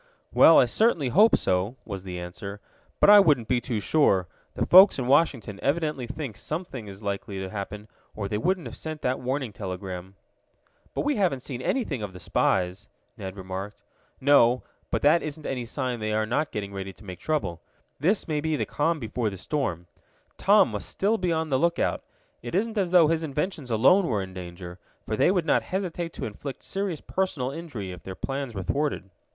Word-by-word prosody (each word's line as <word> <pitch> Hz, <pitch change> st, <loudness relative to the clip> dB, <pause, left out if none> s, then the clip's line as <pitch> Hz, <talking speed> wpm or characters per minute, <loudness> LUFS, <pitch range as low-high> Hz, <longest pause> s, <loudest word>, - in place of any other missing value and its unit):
"Well, -, -, +8 dB
I -, -, +7 dB
certainly 180 Hz, -, +2 dB
hope 210 Hz, -, +6 dB
so," 95 Hz, +6 st, 0 dB
was 100 Hz, -3 st, -6 dB
the 90 Hz, -2 st, -6 dB
answer. 100 Hz, +3 st, -7 dB, 0.4 s
"But -, -, +7 dB
I 205 Hz, -, +10 dB
wouldn't 145 Hz, -, +3 dB
be 125 Hz, -1 st, +1 dB
too 120 Hz, -4 st, -2 dB
sure. 100 Hz, -, +3 dB, 0.3 s
The -, -, 0 dB
folks 190 Hz, +3 st, +8 dB
in 130 Hz, -, -2 dB
Washington 130 Hz, -7 st, +2 dB
evidently 150 Hz, -3 st, -1 dB
think 130 Hz, -4 st, -6 dB
something 150 Hz, -, -5 dB
is 100 Hz, +2 st, -10 dB
likely 100 Hz, 0 st, -4 dB
to 95 Hz, -1 st, -5 dB
happen, 105 Hz, +1 st, -6 dB, 0.3 s
or 100 Hz, -2 st, -3 dB
they 105 Hz, +1 st, -2 dB
wouldn't 185 Hz, -, 0 dB
have -, -, -7 dB
sent 155 Hz, -1 st, -6 dB
that 125 Hz, +1 st, 0 dB
warning 130 Hz, -2 st, -2 dB
telegram." 95 Hz, -1 st, -6 dB, 0.8 s
"But -, -, 0 dB
we 295 Hz, -2 st, 0 dB
haven't 170 Hz, -11 st, +1 dB
seen 125 Hz, -3 st, -5 dB
anything 155 Hz, -, -1 dB
of 100 Hz, -3 st, -5 dB
the 90 Hz, -, -10 dB
spies," 95 Hz, +3 st, 0 dB, 0.3 s
Ned 95 Hz, -2 st, -7 dB
remarked. 95 Hz, +2 st, -6 dB, 0.4 s
"No, 130 Hz, -3 st, +5 dB, 0.3 s
but -, -, -1 dB
that 155 Hz, +4 st, +5 dB
isn't 155 Hz, 0 st, -6 dB
any 125 Hz, -3 st, -3 dB
sign 125 Hz, 0 st, -3 dB
they 110 Hz, 0 st, -2 dB
are 110 Hz, 0 st, +1 dB
not 125 Hz, +7 st, -1 dB
getting 100 Hz, -1 st, -5 dB
ready 95 Hz, 0 st, -5 dB
to 105 Hz, -, -17 dB
make 90 Hz, -2 st, -8 dB
trouble. 115 Hz, -, -2 dB, 0.4 s
This 185 Hz, +9 st, +1 dB
may 150 Hz, -2 st, -1 dB
be 160 Hz, 0 st, 0 dB
the -, -, -1 dB
calm 160 Hz, +2 st, 0 dB
before 115 Hz, -1 st, -2 dB
the 95 Hz, -, -8 dB
storm. 90 Hz, -, -2 dB, 0.5 s
Tom -, -, +5 dB
must -, -, -5 dB
still 215 Hz, +3 st, 0 dB
be 180 Hz, -2 st, 0 dB
on 160 Hz, -1 st, -1 dB
the 130 Hz, -2 st, +2 dB
lookout. 170 Hz, +1 st, +1 dB, 0.4 s
It 120 Hz, -, -5 dB
isn't 220 Hz, +4 st, 0 dB
as 195 Hz, -4 st, +1 dB
though 175 Hz, -2 st, +6 dB
his 165 Hz, 0 st, +1 dB
inventions 150 Hz, -1 st, -3 dB
alone 150 Hz, -, +4 dB
were 105 Hz, -7 st, 0 dB
in 95 Hz, 0 st, -9 dB
danger, 90 Hz, 0 st, -8 dB, 0.3 s
for 110 Hz, -, -2 dB
they -, -, +4 dB
would 180 Hz, -3 st, +1 dB
not -, -, +3 dB
hesitate 175 Hz, -3 st, -3 dB
to -, -, -5 dB
inflict 130 Hz, +6 st, -7 dB
serious 195 Hz, -5 st, -3 dB
personal 155 Hz, -9 st, -2 dB
injury 140 Hz, -, -6 dB
if 90 Hz, -2 st, -9 dB
their 95 Hz, -, -7 dB
plans 135 Hz, -1 st, -4 dB
were 95 Hz, -, -3 dB
thwarted." 140 Hz, -5 st, -2 dB
125 Hz, 200 wpm, -26 LUFS, 100-160 Hz, 0.8 s, I